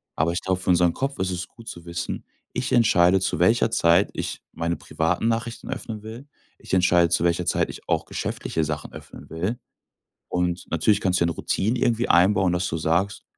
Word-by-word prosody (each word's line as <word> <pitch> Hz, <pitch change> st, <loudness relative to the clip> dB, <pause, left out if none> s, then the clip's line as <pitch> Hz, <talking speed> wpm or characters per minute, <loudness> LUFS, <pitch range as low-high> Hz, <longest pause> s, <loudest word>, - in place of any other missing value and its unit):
Aber 80 Hz, +2 st, +1 dB
ich 85 Hz, -, -1 dB
glaub, 95 Hz, -1 st, 0 dB
für 95 Hz, -, -4 dB
unseren 90 Hz, -1 st, +4 dB
Kopf 135 Hz, +1 st, -3 dB
ist 95 Hz, 0 st, 0 dB
es 90 Hz, 0 st, -4 dB
gut 115 Hz, -1 st, -16 dB
zu 85 Hz, -, -8 dB
wissen: 85 Hz, 0 st, -5 dB, 0.3 s
Ich -, -, -2 dB
entscheide, 95 Hz, -5 st, +4 dB
zu 95 Hz, -, -1 dB
welcher 110 Hz, +5 st, +3 dB
Zeit 85 Hz, -2 st, +4 dB
ich -, -, -4 dB
meine 85 Hz, +1 st, -2 dB
privaten 85 Hz, +7 st, -1 dB
Nachrichten 115 Hz, 0 st, -2 dB
öffnen 110 Hz, -2 st, -5 dB
will. 115 Hz, +6 st, -9 dB, 0.3 s
Ich -, -, -10 dB
entscheide, 90 Hz, -2 st, +4 dB
zu 85 Hz, -, +1 dB
welcher 85 Hz, 0 st, +1 dB
Zeit -, -, +1 dB
ich -, -, -10 dB
auch -, -, +1 dB
geschäftliche 80 Hz, -, -3 dB
Sachen 75 Hz, -1 st, -4 dB
öffnen -, -, -12 dB
will. 90 Hz, +9 st, -3 dB, 0.7 s
Und 90 Hz, 0 st, -1 dB
natürlich 100 Hz, +5 st, +2 dB
kannst 90 Hz, -1 st, +1 dB
du -, -, +5 dB
dir 85 Hz, -, 0 dB
'ne -, -, -7 dB
Routine 115 Hz, +6 st, -1 dB
irgendwie 120 Hz, 0 st, +1 dB
einbauen, 90 Hz, +1 st, +4 dB
dass 90 Hz, +1 st, 0 dB
du 80 Hz, -, -2 dB
sagst: 85 Hz, +6 st, 0 dB
90 Hz, 200 wpm, -24 LUFS, 85-105 Hz, 0.7 s, du